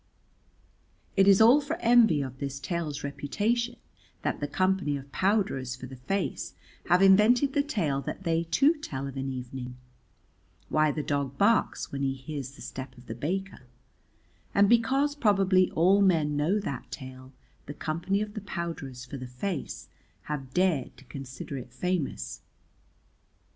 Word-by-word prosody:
It 195 0 +5
is 195 -1 +7
all 245 +7 +7
for 295 +3 -3
envy 230 - +4
of 130 -1 -8
this 140 -1 -4
tale's 155 0 -3
reputation 220 +12 -1 0.5
that - - -1
the 145 - -2
Company 185 -2 +1
of 140 0 -11
Powderers 185 - 0
for 130 - -9
the 130 +1 -9
Face 190 +11 -3 0.3
have 180 +2 +5
invented 225 +8 +5
the 285 - +3
tale 170 - -1
that 190 - -6
they 165 -1 +1
too 270 - +4
tell 140 - -5
of 135 -1 -6
an 135 0 -3
evening, 125 -1 -6 0.9
"Why 155 -1 +3
the 150 0 -3
Dog 140 -2 -2
Barks 225 +6 +2
when 140 - -4
he 135 -1 0
hears 135 0 -6
the - - -11
step 130 -1 -7
of 125 - -15
the 110 - -5
Baker"; 175 +2 -4 0.9
and 200 0 +6
because 265 +6 +3
probably 195 -8 +3
all 190 +5 +4
men 160 -6 +3
know 160 +8 +2
that 140 -11 -5
tale 130 0 -9 0.4
the 145 - -6
Company 170 +6 -1
of 210 -1 -8
the 210 - -5
Powderers 165 -10 -5
for 140 +2 -7
the 130 -1 -7
Face 140 +7 -4 0.4
have 135 -4 -5
dared 180 -8 +1
to 135 - -16
consider 135 +1 -7
it 125 0 -10
famous. 150 - -3
155 Hz, 160 wpm, -28 LUFS, 135-200 Hz, 0.9 s, is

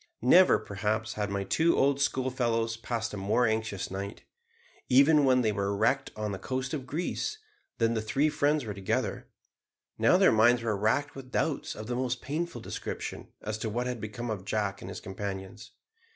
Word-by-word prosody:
Never, 180 +9 +7
perhaps, 110 +1 -2
had 105 -1 -2
my 100 0 -1
two 160 - +2
old 140 +1 +3
schoolfellows 120 -4 0
passed 115 0 -3
a - - -4
more 105 +5 +2
anxious 110 -4 -1
night, 100 +2 -5 0.7
even 140 +3 +6
when 130 -1 +4
they 110 -3 +2
were 100 0 -1
wrecked 135 +6 +2
on 105 -1 -3
the 95 - -5
coast 130 +5 -3
of 135 -4 -4
Greece; 180 - -2 0.4
then 115 0 +2
the 110 - -1
three 135 +7 +1
friends 150 -2 +1
were 105 - -4
together; 95 -1 -2 0.7
now - - +5
their - - +6
minds 115 +2 +4
were 110 -2 0
racked 110 +9 +1
with 130 -2 -10
doubts 150 0 -1
of 110 - -7
the 120 - -3
most 125 -1 -1
painful 155 -2 -4
description - - -5 0.2
as 110 0 -3
to 110 - -2
what 120 +3 -2
had 125 -3 -3
become 120 +2 -4
of 100 -4 -4
Jack 100 -1 -2
and 90 - -7
his 95 - -7
companions. 95 +3 -6
115 Hz, 185 wpm, -29 LUFS, 105-130 Hz, 0.7 s, Never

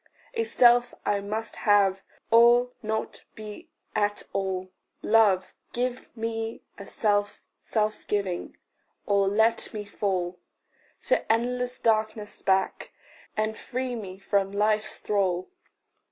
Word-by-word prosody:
A 455 -1 0
self 245 - +4
I 205 -1 +2
must 215 +3 -4
have, 200 -3 +3 0.3
or 240 +2 +6
not 220 0 -3
be 215 +10 -9 0.3
at 205 0 +1
all: 185 -1 -2 0.3
Love, 210 -4 +3 0.2
give 245 0 -3
me 225 0 -3 0.2
a 200 - -9
self 205 -1 0 0.2
self 215 -1 -1
giving 195 -4 -2 0.5
or 200 -1 +3
let 220 +3 +2
me 210 -1 -4
fall 185 -3 -2 0.6
To - - +1
endless 250 +2 0
darkness 215 -2 0
back, 190 0 0 0.4
and 215 0 0
free 255 +2 -4
me 195 -5 -7
from 195 0 0
life's 210 +1 +1
thrall. 190 - -1
215 Hz, 115 wpm, -27 LUFS, 200-230 Hz, 0.6 s, or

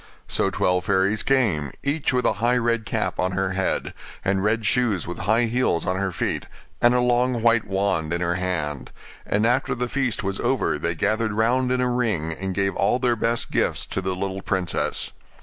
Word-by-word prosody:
So - - +1
twelve 90 -1 0
fairies 95 +3 +2
came, 100 - +1
each 140 +2 +1
with 125 -1 0
a - - +3
high 120 +1 +3
red 115 -2 0
cap - - -2
on 95 +1 0
her 95 0 0
head, 95 0 -1 0.3
and 95 0 +1
red 110 +1 +1
shoes 105 -4 +1
with 90 - -6
high 115 +2 +4
heels 115 -8 0
on 90 - 0
her 95 0 -1
feet, - - -2 0.3
and 120 +1 +5
a - - +3
long 125 -1 +1
white 115 -1 +4
wand 95 -5 0
in 85 - 0
her 85 0 0
hand: 85 -6 -2 0.4
and 105 +2 +1
after 125 +3 +1
the 125 +1 -2
feast 130 -3 -1
was 95 0 -2
over 120 - 0
they 85 +2 -1
gathered 110 +6 0
round 125 +4 +2
in 130 0 +1
a 125 - +2
ring 110 -11 0
and 95 +2 -4
gave 100 0 0
all - - +2
their 125 -2 +1
best 115 +1 -1
gifts - - +1
to 95 - -3
the 95 0 -2
little 95 +1 -3
princess. 95 -4 -1
105 Hz, 200 wpm, -23 LUFS, 95-120 Hz, 0.4 s, and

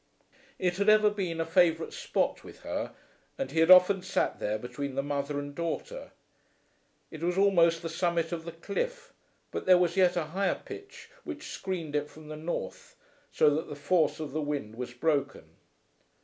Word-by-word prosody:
It 180 -1 0
had 200 +1 +3
ever 215 0 +6
been 185 -5 -3
a 165 - 0
favourite 165 -1 +2
spot - - -1
with - - -13
her, - - -4 0.4
and 270 - -3
he 160 - 0
had 165 +1 +4
often 185 +1 +8
sat 185 - -1
there 105 +1 -1
between 125 +4 -5
the 135 - 0
mother 145 0 -2
and 145 0 -5
daughter. 170 - -4 1.0
It 155 - -9
was 175 +2 0
almost 170 -4 +4
the - - -2
summit 170 0 0
of 165 -2 -4
the 170 - -6
cliff, 480 - -4 0.4
but - - -5
there 185 -1 +8
was 180 -1 +1
yet 180 -2 +4
a 175 - +1
higher 195 0 0
pitch 405 0 -10
which 310 -3 -7
screened 170 -6 -4
it 150 0 -1
from 155 -1 -13
the 155 - -5
north, 155 - -5 0.4
so 150 - +4
that 155 +2 -2
the 145 - -6
force 160 +4 +1
of 155 -3 -5
the 155 +2 -2
wind 145 -7 -3
was 125 +1 -5
broken. 135 - -2
165 Hz, 185 wpm, -29 LUFS, 145-185 Hz, 1.0 s, often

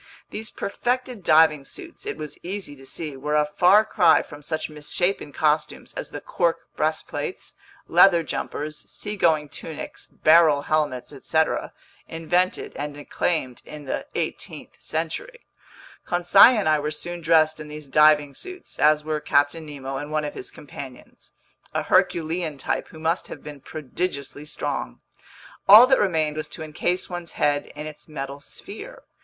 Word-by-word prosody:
These 220 +1 -5
perfected 245 0 -3
diving 155 -3 +5
suits, - - -8
it - - -3
was 150 -1 -7
easy 185 -5 -5
to 135 -1 -14
see, 150 -2 -5
were 150 +3 -2
a 150 0 +4
far 180 +8 +5
cry 170 -6 +4
from 145 -1 -12
such 155 +2 -3
misshapen 155 +2 -2
costumes 150 0 0
as - - -5
the - - -6
cork - - 0
breastplates, - - -3 0.3
leather 175 -4 +6
jumpers, 150 0 -4
seagoing 170 -8 +1
tunics, 150 +2 -8
barrel 155 -3 +5
helmets, 150 -5 -1
etc., - - 0 0.4
invented 175 +3 0
and 145 0 -5
acclaimed 145 -3 -2
in 150 -1 -10
the 130 - -3
18th - - -4
century. 165 - -4 0.6
Conseil 180 +7 +6
and 205 - 0
I 155 -1 +4
were 150 +1 -2
soon 175 +2 -6
dressed 160 -1 +3
in 155 - -7
these 150 0 -8
diving 150 0 +4
suits, 370 - -9
as 150 0 +4
were 155 0 -2
Captain 145 +2 +1
Nemo 135 -2 -5
and 145 +2 -6
one 155 -1 0
of 145 - -4
his - - -5
companions—a 135 -3 -9
herculean 165 -2 +1
type - - -2
who - - -13
must 165 +3 0
have - - -9
been 145 -2 -9
prodigiously 150 -1 -4
strong. - - -4 0.7
All 215 +5 +11
that 265 0 +4
remained 160 -6 +1
was 155 - -3
to 160 - -7
encase 175 +4 -1
one's 175 -2 -5
head 145 -1 +1
in 150 +1 -6
its 155 -1 -9
metal 140 -1 -6
sphere. 145 - -10
155 Hz, 150 wpm, -24 LUFS, 145-175 Hz, 0.7 s, All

